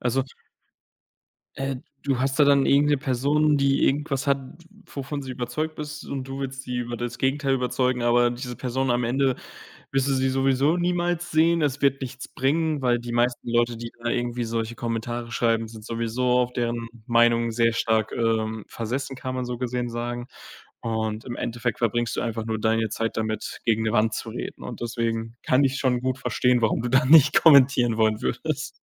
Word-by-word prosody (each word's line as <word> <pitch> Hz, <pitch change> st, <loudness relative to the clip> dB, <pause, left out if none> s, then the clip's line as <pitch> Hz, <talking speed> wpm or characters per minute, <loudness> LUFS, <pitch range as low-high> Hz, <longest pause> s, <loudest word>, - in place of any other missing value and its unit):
Also 125 Hz, +2 st, +1 dB, 1.3 s
äh, 135 Hz, -1 st, -2 dB, 0.3 s
du 135 Hz, -3 st, 0 dB
hast 135 Hz, +2 st, 0 dB
da 145 Hz, -, +7 dB
dann 140 Hz, -1 st, +4 dB
irgend 145 Hz, +1 st, +4 dB
'ne 145 Hz, -, +4 dB
Person, 145 Hz, +4 st, +2 dB
die 140 Hz, 0 st, +2 dB
irgendwas 140 Hz, 0 st, 0 dB
hat, 140 Hz, 0 st, +3 dB, 0.5 s
wovon 140 Hz, +1 st, -4 dB
sie 130 Hz, -, -7 dB
überzeugt 140 Hz, +6 st, -4 dB
ist, 150 Hz, 0 st, -6 dB
und 135 Hz, -2 st, -4 dB
du 135 Hz, +1 st, -6 dB
willst 135 Hz, 0 st, -5 dB
sie 125 Hz, -1 st, -4 dB
über 120 Hz, 0 st, -4 dB
das 120 Hz, 0 st, -5 dB
Gegenteil 135 Hz, 0 st, +1 dB
überzeugen, 125 Hz, -1 st, 0 dB
aber 120 Hz, 0 st, +4 dB
diese 120 Hz, 0 st, -6 dB
Person 130 Hz, +1 st, -1 dB
am 120 Hz, 0 st, +1 dB
Ende 130 Hz, +1 st, +1 dB, 0.6 s
wirst 135 Hz, 0 st, +1 dB
du 135 Hz, -, +2 dB
sie 130 Hz, 0 st, +1 dB
sowieso 135 Hz, +4 st, +2 dB
niemals 175 Hz, 0 st, -1 dB
sehen. 165 Hz, +1 st, +3 dB
Es 145 Hz, -1 st, -1 dB
wird 135 Hz, -1 st, +3 dB
nichts 130 Hz, 0 st, -6 dB
bringen, 155 Hz, +2 st, 0 dB
weil 120 Hz, -1 st, +2 dB
die 120 Hz, 0 st, -6 dB
meisten 120 Hz, 0 st, 0 dB
Leute, 120 Hz, 0 st, +2 dB
die 115 Hz, 0 st, -7 dB
da 120 Hz, -, -1 dB
irgendwie 120 Hz, 0 st, -1 dB
solche 115 Hz, 0 st, -3 dB
Kommentare 115 Hz, +1 st, -4 dB
schreiben, 115 Hz, -1 st, +1 dB
sind 110 Hz, -1 st, -11 dB
sowieso 115 Hz, +2 st, -2 dB, 0.2 s
auf 125 Hz, 0 st, -1 dB
deren 120 Hz, -1 st, -2 dB, 0.2 s
Meinung 115 Hz, -1 st, +3 dB
sehr 115 Hz, 0 st, +2 dB
stark, 110 Hz, -1 st, 0 dB
ähm, 110 Hz, -2 st, -1 dB
versessen, 130 Hz, +4 st, -4 dB
kann 130 Hz, 0 st, -5 dB
man 125 Hz, -1 st, -2 dB
so 120 Hz, -1 st, -4 dB
gesehen 125 Hz, -1 st, -2 dB
sagen, 120 Hz, +1 st, -4 dB, 0.6 s
und 110 Hz, -1 st, -2 dB
im 120 Hz, -2 st, -6 dB
Endeffekt 120 Hz, 0 st, -3 dB
verbringst 120 Hz, 0 st, 0 dB
du -, -, 0 dB
einfach 115 Hz, -1 st, -3 dB
nur 110 Hz, -1 st, -2 dB
deine 110 Hz, 0 st, +1 dB
Zeit 115 Hz, +2 st, -3 dB
damit, 110 Hz, -1 st, -3 dB
gegen 110 Hz, -1 st, +2 dB
'ne 110 Hz, -, 0 dB
Wand 110 Hz, 0 st, +2 dB
zu 115 Hz, -, -4 dB
reden. 115 Hz, -, -6 dB
Und 120 Hz, -, -7 dB
deswegen 115 Hz, -1 st, -2 dB
kann 130 Hz, +2 st, +3 dB
ich 135 Hz, 0 st, +1 dB
schon 125 Hz, -2 st, +1 dB
gut 130 Hz, 0 st, -1 dB
verstehen, 125 Hz, +1 st, +1 dB
warum 115 Hz, 0 st, +1 dB
du 120 Hz, -, -2 dB
da 130 Hz, 0 st, +4 dB
nicht 145 Hz, -1 st, +7 dB
kommentieren 130 Hz, -6 st, +6 dB
wollen 110 Hz, -1 st, +2 dB
würdest. 65 Hz, -, -2 dB
125 Hz, 190 wpm, -25 LUFS, 115-135 Hz, 1.3 s, da